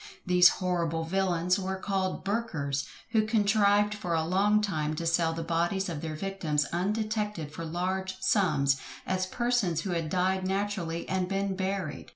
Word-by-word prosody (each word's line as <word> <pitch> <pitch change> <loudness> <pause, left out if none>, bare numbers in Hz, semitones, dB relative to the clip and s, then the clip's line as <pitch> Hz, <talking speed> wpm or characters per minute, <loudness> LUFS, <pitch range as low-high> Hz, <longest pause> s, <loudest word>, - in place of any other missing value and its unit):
These 180 -1 +7
horrible 170 -3 -1
villains 180 +1 +1
were 190 0 -2
called 190 -1 -2
Burkers, 165 -10 -2 0.2
who 220 -2 +3
contrived 210 -1 +3
for 205 -5 -2
a 160 -1 +1
long 200 +5 +3
time 155 -7 -1
to 165 - -4
sell 165 0 +2
the 165 0 -4
bodies 170 +4 0
of 155 -4 -4
their 160 -1 -4
victims 155 -5 -1
undetected 210 -3 -1
for 165 - -5
large 185 +3 -2
sums, 170 -9 +2 0.3
as 185 0 -1
persons 235 -8 0
who 190 - -3
had 165 -2 -1
died 185 +2 +1
naturally 190 -4 -2
and 185 -1 0
been 195 0 -1
buried. 190 -6 -3
185 Hz, 160 wpm, -29 LUFS, 165-200 Hz, 0.3 s, These